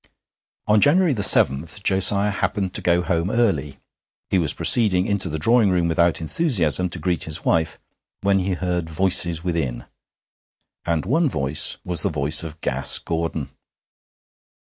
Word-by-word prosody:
On 105 Hz, 0 st, +2 dB
January 170 Hz, -, +2 dB
7 80 Hz, -, +5 dB, 0.2 s
Josiah 100 Hz, +2 st, +2 dB
happened 100 Hz, -1 st, -3 dB
to -, -, -3 dB
go 90 Hz, 0 st, 0 dB
home 85 Hz, 0 st, -2 dB
early. 80 Hz, -, -2 dB, 0.5 s
He 95 Hz, -, +1 dB
was 80 Hz, -5 st, -1 dB
proceeding 95 Hz, -6 st, +3 dB
into 100 Hz, -4 st, -2 dB
the 80 Hz, -, -4 dB
drawing 115 Hz, +6 st, +2 dB
room 90 Hz, -2 st, 0 dB
without 85 Hz, 0 st, 0 dB
enthusiasm 90 Hz, -, 0 dB
to 85 Hz, -, -2 dB
greet 85 Hz, +1 st, -2 dB
his 80 Hz, +1 st, -3 dB
wife, 80 Hz, -1 st, -1 dB, 0.4 s
when 100 Hz, 0 st, +1 dB
he 95 Hz, +1 st, -3 dB
heard 90 Hz, -2 st, -4 dB
voices 85 Hz, -1 st, 0 dB
within; 80 Hz, -9 st, -4 dB, 1.0 s
and 85 Hz, -3 st, -2 dB
one 160 Hz, +4 st, 0 dB
voice 70 Hz, -, +1 dB
was 90 Hz, -2 st, +1 dB
the -, -, -1 dB
voice 75 Hz, -1 st, +3 dB
of 80 Hz, -1 st, -9 dB
Gas 65 Hz, +1 st, +4 dB
Gordon. 80 Hz, -3 st, -5 dB
90 Hz, 145 wpm, -20 LUFS, 80-100 Hz, 1.0 s, 7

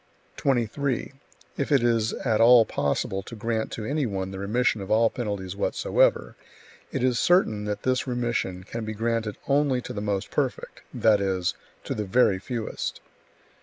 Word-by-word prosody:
23. 130 Hz, +1 st, 0 dB, 0.4 s
If 140 Hz, -, -2 dB
it 135 Hz, -4 st, +4 dB
is 115 Hz, -2 st, +2 dB
at 115 Hz, -4 st, 0 dB
all 120 Hz, 0 st, +8 dB
possible 95 Hz, +6 st, -1 dB
to 115 Hz, -, -10 dB
grant 115 Hz, 0 st, -2 dB
to 110 Hz, -, -5 dB
any 140 Hz, +1 st, 0 dB
one 95 Hz, -2 st, -3 dB
the 95 Hz, -, -6 dB
remission 110 Hz, +2 st, +1 dB
of 95 Hz, -, -7 dB
all 115 Hz, +1 st, +4 dB
penalties 100 Hz, -6 st, -4 dB
whatsoever, 100 Hz, -, +1 dB, 0.6 s
it -, -, -2 dB
is 125 Hz, -2 st, +2 dB
certain 110 Hz, -, +3 dB
that 105 Hz, -1 st, -3 dB
this 130 Hz, +1 st, 0 dB
remission 120 Hz, -7 st, -2 dB
can 115 Hz, +4 st, -6 dB
be 110 Hz, 0 st, -4 dB
granted 115 Hz, -1 st, -2 dB
only 140 Hz, -2 st, +2 dB
to -, -, -6 dB
the 100 Hz, -, -4 dB
most 100 Hz, -2 st, -2 dB
perfect, -, -, -2 dB
that 105 Hz, -3 st, +3 dB
is, 95 Hz, -2 st, 0 dB, 0.3 s
to -, -, -3 dB
the 105 Hz, -, -2 dB
very 100 Hz, -2 st, +3 dB
fewest. 115 Hz, +2 st, -4 dB
115 Hz, 165 wpm, -26 LUFS, 100-125 Hz, 0.6 s, all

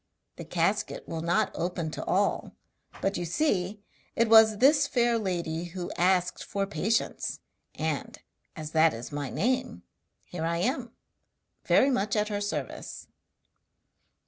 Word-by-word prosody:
The -, -, -7 dB
casket -, -, -1 dB
will 165 Hz, -, -4 dB
not 175 Hz, +5 st, +1 dB
open 170 Hz, -2 st, -3 dB
to -, -, -5 dB
all, -, -, 0 dB, 0.5 s
but 195 Hz, -1 st, +1 dB
you 175 Hz, -, -2 dB
see 200 Hz, -, 0 dB, 0.3 s
it 230 Hz, -1 st, +2 dB
was 220 Hz, -1 st, +7 dB
this 285 Hz, +4 st, +5 dB
fair 240 Hz, -3 st, +2 dB
lady 170 Hz, -4 st, -2 dB
who 175 Hz, +1 st, -6 dB
asked 180 Hz, 0 st, +1 dB
for 200 Hz, 0 st, -2 dB
patience, 205 Hz, +4 st, -1 dB, 0.4 s
and, -, -, -3 dB, 0.4 s
as 155 Hz, -1 st, -6 dB
that 160 Hz, -2 st, +4 dB
is 115 Hz, +5 st, -8 dB
my 145 Hz, -2 st, -3 dB
name, 255 Hz, +3 st, -1 dB, 0.4 s
here 170 Hz, -2 st, -6 dB
I 170 Hz, +1 st, 0 dB
am, 240 Hz, +5 st, -1 dB, 0.7 s
very 275 Hz, -, +4 dB
much 210 Hz, -4 st, 0 dB
at 210 Hz, 0 st, +1 dB
her 205 Hz, -1 st, -2 dB
service.' 205 Hz, +1 st, -5 dB
195 Hz, 140 wpm, -28 LUFS, 170-225 Hz, 0.7 s, was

